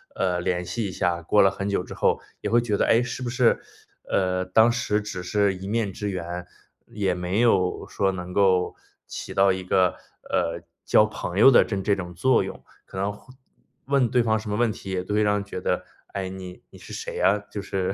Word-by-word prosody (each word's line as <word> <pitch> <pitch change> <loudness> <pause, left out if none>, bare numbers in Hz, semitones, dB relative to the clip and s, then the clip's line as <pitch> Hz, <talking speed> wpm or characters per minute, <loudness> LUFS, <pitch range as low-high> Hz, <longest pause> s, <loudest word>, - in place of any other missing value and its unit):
呃， 90 -1 0
联 90 0 -1
系 110 +2 -2
一 - - -5
下， 90 -2 -1
过 95 +6 +3
了 95 - +5
很 100 +1 -4
久 100 -2 0
之 - - -9
后 - - +1 0.2
也 - - -2
会 120 - +4
觉 110 -3 -1
得， - - +2
哎， 115 +2 +4
是 120 +1 -5
不 125 - -2
是， 120 -1 +2 0.5
呃， 90 -1 +1
当 110 +5 +4
时 115 -3 0
只 105 -3 -6
是 100 +2 +1
一 95 +1 -8
面 105 -2 -1
之 105 +2 -4
缘， 90 -1 -5 0.4
也 100 -3 -1
没 90 +3 -2
有 95 -6 +2
说 95 -1 0
能 90 -1 -6
够 95 -2 +2 0.3
起 - - -7
到 95 0 +5
一 95 0 -5
个， 90 0 +3 0.4
呃， 85 +1 -1 0.2
交 105 - +5
朋 100 -3 -5
友 135 +5 +9
的 120 - +7
真 100 -3 -3
这 100 0 +2
种 90 -2 -7
作 130 +9 +3
用， - - -8 0.2
可 - - -10
能 100 +2 -1
会 130 +5 -17 0.5
问 135 -3 +2
对 125 +1 +3
方 110 -1 +1
什 110 -1 -7
么 105 - -1
问 120 -1 +2
题 100 - -9
也 95 -1 -2
都 105 - -4
会 105 - +3
让 105 -1 +3
人 100 - -1
觉 95 -2 -6
得： - - -1 0.3
“哎， 95 -2 -3
你 95 -1 -9
你 - - -14
是 - - -12
谁 - - -5
呀？” 100 +2 +4 0.2
就 100 - -3
是 95 -1 -2
100 Hz, 245 characters per minute, -25 LUFS, 90-110 Hz, 0.5 s, 友